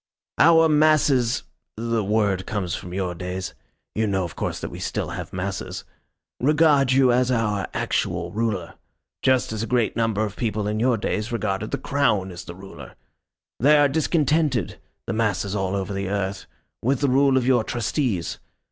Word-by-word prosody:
Our 165 +1 +6
masses 150 -5 +3 0.3
the 115 -1 -1
word 100 -2 0
comes 95 -5 -2
from 90 - -6
your 90 -1 -2
days 90 +1 -5 0.4
you 110 0 0
know, 95 -2 0
of 85 - -6
course, - - -3
that - - -6
we - - -8
still - - -3
have - - -6
masses 95 0 -4 0.6
regard 145 -1 +4
you 130 -1 +5
as 125 +1 +2
our 105 -5 0
actual - - -1
ruler. 105 -6 -2 0.5
Just 130 -2 +2
as 110 - -3
a 115 - -3
great 120 -3 +1
number 110 -2 +1
of 105 -1 -6
people 105 -3 -2
in 105 +1 -1
your 120 0 +2
days 105 +1 -2
regarded 110 -2 -2
the - - -2
Crown 105 -10 0
as 85 - -9
the 85 - -8
ruler. 95 +1 -11 0.6
They 150 +5 +5
are 145 -1 +5
discontented 150 - +1 0.3
the - - -3
masses 105 -3 0
all 95 -1 -1
over 95 0 -3
the 100 -1 -3
earth 100 -1 -3 0.3
with 130 +3 0
the 140 - +3
rule 135 +1 +4
of 125 - +1
your 125 -3 +3
Trustees. 120 - -2
110 Hz, 175 wpm, -23 LUFS, 95-130 Hz, 0.6 s, Our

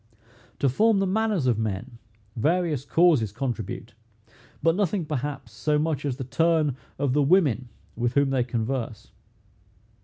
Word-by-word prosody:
To 140 - +1
form 215 - +3
the 195 - +2
manners 205 -5 0
of 120 -4 +2
men, 110 +3 -4 0.4
various 155 +1 0
causes 150 - +3
contribute; 115 -1 -4 0.7
but 165 +1 +4
nothing, 190 -3 0
perhaps, 145 -1 -4
so 150 -1 0
much 150 -2 -1
as 130 -3 -2
the 135 - -4
turn 155 +1 +1 0.2
of 140 -2 0
the 145 - +3
women 140 - +3 0.3
with 120 +1 -1
whom 140 -1 +3
they 130 -2 +2
converse. 120 -1 -3
140 Hz, 145 wpm, -25 LUFS, 120-165 Hz, 0.7 s, but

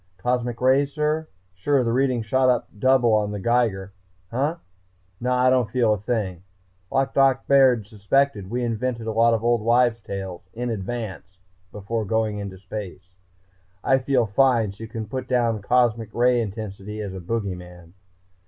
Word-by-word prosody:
"Cosmic 120 +3 -1
rays, 135 +2 +3
sir? 155 +1 -1 0.3
Sure, 130 +9 +1
the 115 -1 0
reading 130 -2 +1
shot 130 +4 +2
up 125 -1 +1
double 130 -2 +4
on 105 -1 +2
the 105 0 -4
Geiger... 100 -4 0 0.4
huh? 140 +7 0 0.6
Naw, 125 +1 +1
I 130 - +5
don't 125 -4 +2
feel 115 -2 +2
a 105 - -3
thing... 100 -5 -2 0.5
like 135 0 +1
Doc 135 -1 +3
Baird 130 -6 +4
suspected, 105 0 0
we 125 +2 -2
invented 115 0 -2
a 110 - -2
lot 115 +1 +4
of 110 - -4
Old 120 -1 +2
Wives' 120 0 +2
Tales 95 -3 -7
in 120 +1 -2
advance, 95 -3 -5 0.3
before 110 +2 -3
going 110 0 -1
into 100 -2 -6
space. 95 -2 -8 0.7
I 135 0 +3
feel 130 -2 +1
fine, 115 -1 +2
so 105 +3 -9
you - - -10
can 110 0 -5
put 130 +4 -5
down 120 -4 +1
cosmic 115 -1 +1
ray 120 0 +3
intensity 105 -1 -6
as 100 -3 -5
a 95 - -6
Boogey 100 +1 -3
Man.... 90 -1 -13
115 Hz, 170 wpm, -23 LUFS, 100-125 Hz, 0.7 s, I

